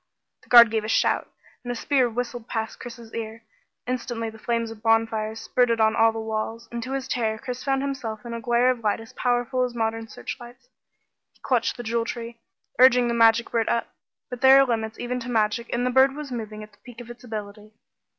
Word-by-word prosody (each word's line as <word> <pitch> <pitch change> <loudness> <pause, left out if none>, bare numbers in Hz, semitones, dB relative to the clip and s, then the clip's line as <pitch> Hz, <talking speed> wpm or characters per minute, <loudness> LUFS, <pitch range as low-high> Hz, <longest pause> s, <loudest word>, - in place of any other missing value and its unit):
The - - -24
guard 235 -2 +9
gave 220 -1 0
a - - -4
shout, 225 - +1 0.3
and 245 - -4
a - - -3
spear 260 0 +1
whistled 240 0 -5
past 225 -1 -4
Chris's 235 -2 -10
ear. 225 0 -6 0.4
Instantly 240 -2 -3
the 220 - -14
flames 230 0 -2
of 220 -1 -11
bonfires 225 -1 +1
spurted 235 0 +1
on 220 0 +3
all 225 0 +5
the 225 - -6
walls, 220 +1 -4
and 235 0 -4
to 255 +3 -5
his 270 -1 -3
terror 220 -4 -1
Chris 250 +2 -6
found 270 -1 0
himself 240 -6 -4
in 235 - -6
a 230 - -5
glare 240 +2 +3
of 250 - -4
light 215 -2 0
as 225 0 -12
powerful 245 +1 0
as 245 -1 -3
modern 225 0 -2
searchlights. 245 +2 -9 0.6
He - - -30
clutched 245 -2 0
the 240 - -6
Jewel 230 0 -1
Tree, 235 0 -6 0.4
urging 250 -1 +6
the - - 0
magic 230 0 +4
bird 230 -2 0
up, 235 - -1 0.3
but 250 -1 -8
there 265 0 +8
are 275 - +6
limits 220 -3 -2
even 250 +1 -3
to 245 +1 -7
magic 225 0 0
and 245 +1 0
the 250 - +1
bird 265 +2 +4
was 295 -2 -7
moving 215 -3 -6
at 215 - -13
the 205 - -26
peak 245 -1 -13
of 240 0 -9
its 240 +1 -13
ability. 215 -2 -8
235 Hz, 220 wpm, -24 LUFS, 225-245 Hz, 0.6 s, guard